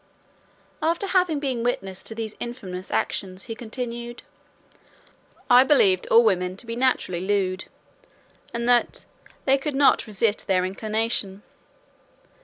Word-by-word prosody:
After 335 Hz, +5 st, 0 dB
having 360 Hz, -5 st, +2 dB
been 265 Hz, -4 st, -2 dB
witness 195 Hz, -6 st, -2 dB
to 225 Hz, -, -8 dB
these 220 Hz, -1 st, -5 dB
infamous 190 Hz, -6 st, -6 dB
actions, 185 Hz, -1 st, -2 dB
he 230 Hz, -, -6 dB
continued, 240 Hz, +1 st, -6 dB, 1.2 s
"I 250 Hz, 0 st, +7 dB
believed 200 Hz, -10 st, +3 dB
all 230 Hz, +1 st, +6 dB
women 185 Hz, -3 st, +1 dB
to 235 Hz, -, -11 dB
be 230 Hz, 0 st, -4 dB
naturally 240 Hz, -8 st, 0 dB
lewd; 190 Hz, -1 st, -1 dB, 0.9 s
and 235 Hz, 0 st, -3 dB
that 245 Hz, -1 st, +3 dB, 0.4 s
they 270 Hz, 0 st, +4 dB
could 285 Hz, 0 st, -3 dB
not 280 Hz, -3 st, +4 dB
resist 210 Hz, +1 st, -1 dB
their 185 Hz, -2 st, +2 dB
inclination. 215 Hz, 0 st, -2 dB
230 Hz, 125 wpm, -24 LUFS, 190-250 Hz, 1.2 s, I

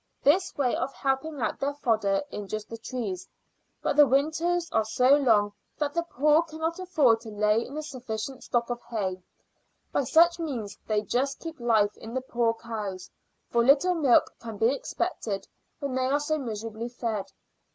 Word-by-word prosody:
This 355 Hz, +7 st, +3 dB
way 260 Hz, -4 st, +2 dB
of 275 Hz, -, -2 dB
helping 275 Hz, +2 st, -1 dB
out 220 Hz, -, -1 dB
their 280 Hz, +1 st, -1 dB
fodder 215 Hz, -7 st, +1 dB
injures 210 Hz, +1 st, -5 dB
the 230 Hz, -, -9 dB
trees. 220 Hz, -7 st, -4 dB, 0.6 s
But -, -, 0 dB
the 295 Hz, -1 st, +8 dB
winters 320 Hz, +6 st, +1 dB
are 220 Hz, -, +3 dB
so 250 Hz, +5 st, +4 dB
long 220 Hz, -7 st, +3 dB, 0.2 s
that 290 Hz, -1 st, -1 dB
the 335 Hz, -, +1 dB
poor 305 Hz, -1 st, +3 dB
cannot 325 Hz, +1 st, -4 dB
afford 290 Hz, -11 st, +3 dB
to 230 Hz, -, -9 dB
lay 210 Hz, +2 st, +2 dB
in 280 Hz, -, -8 dB
a 310 Hz, -, -3 dB
sufficient 255 Hz, -2 st, -5 dB
stock 240 Hz, -1 st, 0 dB
of 240 Hz, 0 st, -4 dB
hay. 190 Hz, -5 st, -2 dB, 0.7 s
By 280 Hz, -, +1 dB
such 340 Hz, +6 st, +5 dB
means 245 Hz, -11 st, -4 dB
they 215 Hz, -1 st, +1 dB
just 270 Hz, +5 st, 0 dB
keep 325 Hz, -3 st, -7 dB
life 220 Hz, -4 st, +2 dB
in 225 Hz, +2 st, -9 dB
the 260 Hz, -, 0 dB
poor 235 Hz, -3 st, 0 dB
cows, 210 Hz, -5 st, -6 dB, 0.4 s
for 235 Hz, 0 st, +3 dB
little 280 Hz, +8 st, +5 dB
milk 285 Hz, -8 st, +4 dB
can 225 Hz, -2 st, -7 dB
be 230 Hz, +5 st, +3 dB
expected 255 Hz, -, -3 dB, 0.3 s
when 280 Hz, -3 st, -4 dB
they 260 Hz, 0 st, +1 dB
are 280 Hz, +2 st, +2 dB
so 310 Hz, +1 st, -1 dB
miserably 225 Hz, -1 st, -5 dB
fed. 230 Hz, -4 st, -3 dB
250 Hz, 175 wpm, -27 LUFS, 220-295 Hz, 0.7 s, the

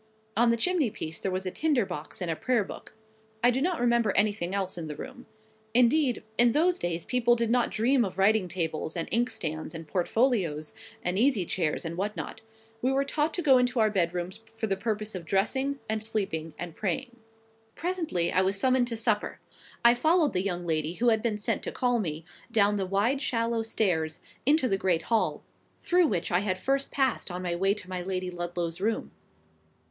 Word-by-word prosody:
On 235 Hz, +2 st, +4 dB
the 235 Hz, -, +3 dB
chimney 335 Hz, -1 st, +1 dB
piece 160 Hz, -5 st, -6 dB
there 190 Hz, -, -2 dB
was 185 Hz, +1 st, -3 dB
a 185 Hz, -, -2 dB
tinder 290 Hz, -, +1 dB
box 175 Hz, 0 st, -6 dB
and 170 Hz, -, -1 dB
a -, -, -1 dB
Prayer 245 Hz, +4 st, +1 dB
book. 195 Hz, -, -10 dB, 0.5 s
I 245 Hz, -, +6 dB
do 260 Hz, +2 st, -1 dB
not 350 Hz, +2 st, 0 dB
remember 235 Hz, -3 st, +3 dB
anything 205 Hz, -3 st, +1 dB
else 190 Hz, -1 st, -2 dB
in 170 Hz, -2 st, -5 dB
the 150 Hz, -, -5 dB
room. 245 Hz, -, -9 dB, 0.5 s
Indeed, 250 Hz, +1 st, +3 dB, 0.2 s
in 240 Hz, -1 st, +6 dB
those 345 Hz, +4 st, +2 dB
days 170 Hz, -1 st, -2 dB
people 240 Hz, -1 st, +3 dB
did 230 Hz, -1 st, 0 dB
not 245 Hz, -1 st, +2 dB
dream 245 Hz, +3 st, +2 dB
of 190 Hz, -3 st, -4 dB
writing 200 Hz, 0 st, +3 dB
tables, 165 Hz, -2 st, -3 dB
and 165 Hz, -, -2 dB
inkstands, 170 Hz, -10 st, -1 dB
and 165 Hz, -1 st, -7 dB
portfolios, 180 Hz, -, 0 dB, 0.3 s
and 180 Hz, +2 st, 0 dB
easy 240 Hz, -7 st, +3 dB
chairs, 165 Hz, -3 st, -1 dB
and 165 Hz, +1 st, -4 dB
what 205 Hz, +3 st, -2 dB
not. -, -, -6 dB, 0.4 s
We 255 Hz, -, +2 dB
were 275 Hz, +1 st, +1 dB
taught 300 Hz, +2 st, 0 dB
to 350 Hz, -, -2 dB
go 265 Hz, -4 st, +6 dB
into 250 Hz, 0 st, +1 dB
our 215 Hz, -1 st, +4 dB
bed 175 Hz, -4 st, +1 dB
rooms 180 Hz, +1 st, -4 dB, 0.2 s
for 225 Hz, -, -1 dB
the 195 Hz, -3 st, 0 dB
purposes 215 Hz, +1 st, -2 dB
of 185 Hz, -3 st, -5 dB
dressing, 265 Hz, +10 st, 0 dB
and 220 Hz, 0 st, -1 dB
sleeping, 165 Hz, -8 st, -3 dB
and 175 Hz, -2 st, -6 dB
praying. 225 Hz, +7 st, -3 dB, 0.6 s
Presently 325 Hz, -, -1 dB
I 185 Hz, -, +4 dB
was 195 Hz, +1 st, +2 dB
summoned 255 Hz, +1 st, +3 dB
to 230 Hz, -1 st, -2 dB
supper. 220 Hz, -2 st, 0 dB, 0.5 s
I 235 Hz, -, +9 dB
followed 310 Hz, +5 st, +2 dB
the 180 Hz, -, +1 dB
young 180 Hz, -2 st, -3 dB
lady 160 Hz, -1 st, 0 dB
who 240 Hz, +4 st, +3 dB
had 220 Hz, -1 st, +2 dB
been 220 Hz, -2 st, -1 dB
sent 205 Hz, -, -1 dB
to -, -, -4 dB
call 245 Hz, -1 st, +1 dB
me, 160 Hz, -5 st, -3 dB, 0.3 s
down 205 Hz, -2 st, +3 dB
the 190 Hz, -2 st, -2 dB
wide 215 Hz, +8 st, +1 dB
shallow 230 Hz, -4 st, 0 dB
stairs, 175 Hz, -8 st, 0 dB, 0.3 s
into 295 Hz, -2 st, +4 dB
the 195 Hz, -3 st, 0 dB
great 170 Hz, -4 st, +1 dB
hall, 225 Hz, -2 st, 0 dB, 0.4 s
through 355 Hz, -1 st, +3 dB
which 180 Hz, -5 st, -1 dB
I 175 Hz, -, +3 dB
had 190 Hz, -2 st, -1 dB
first 275 Hz, +7 st, 0 dB
passed 265 Hz, -6 st, 0 dB
on 180 Hz, 0 st, -5 dB
my 175 Hz, -1 st, -1 dB
way 195 Hz, +3 st, +2 dB
to 205 Hz, -3 st, -7 dB
my 185 Hz, -1 st, -4 dB
Lady 185 Hz, 0 st, -3 dB
Ludlow's 175 Hz, 0 st, -4 dB
room. 220 Hz, +2 st, -1 dB
210 Hz, 205 wpm, -28 LUFS, 180-245 Hz, 0.6 s, I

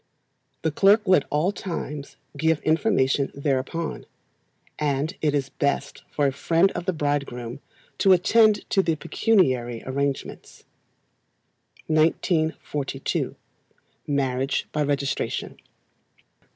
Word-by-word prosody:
The 160 Hz, -, +1 dB
clerk 200 Hz, +7 st, +4 dB
will 185 Hz, -, +4 dB
at 140 Hz, -, -2 dB
all 155 Hz, +6 st, +1 dB
times 150 Hz, -7 st, -6 dB, 0.2 s
give 160 Hz, +1 st, +1 dB
information 155 Hz, -5 st, +2 dB
thereupon; 140 Hz, +3 st, -2 dB, 0.7 s
and 150 Hz, +4 st, -1 dB
it 150 Hz, -2 st, +1 dB
is 140 Hz, -1 st, -1 dB
best 140 Hz, -1 st, -2 dB
for 145 Hz, -, 0 dB
a 135 Hz, -, +3 dB
friend 165 Hz, +7 st, +2 dB
of 175 Hz, -, -5 dB
the -, -, +3 dB
bridegroom 140 Hz, -6 st, -3 dB, 0.4 s
to 195 Hz, -, +5 dB
attend 210 Hz, +3 st, +4 dB
to 195 Hz, -, +4 dB
the 165 Hz, -3 st, 0 dB
pecuniary 130 Hz, -, +1 dB
arrangements. 140 Hz, +1 st, -4 dB, 1.2 s
1942. 155 Hz, -3 st, 0 dB, 0.7 s
Marriage 135 Hz, -1 st, 0 dB
by 150 Hz, -, -1 dB
Registration. 140 Hz, -1 st, -2 dB
150 Hz, 105 wpm, -24 LUFS, 140-170 Hz, 1.2 s, to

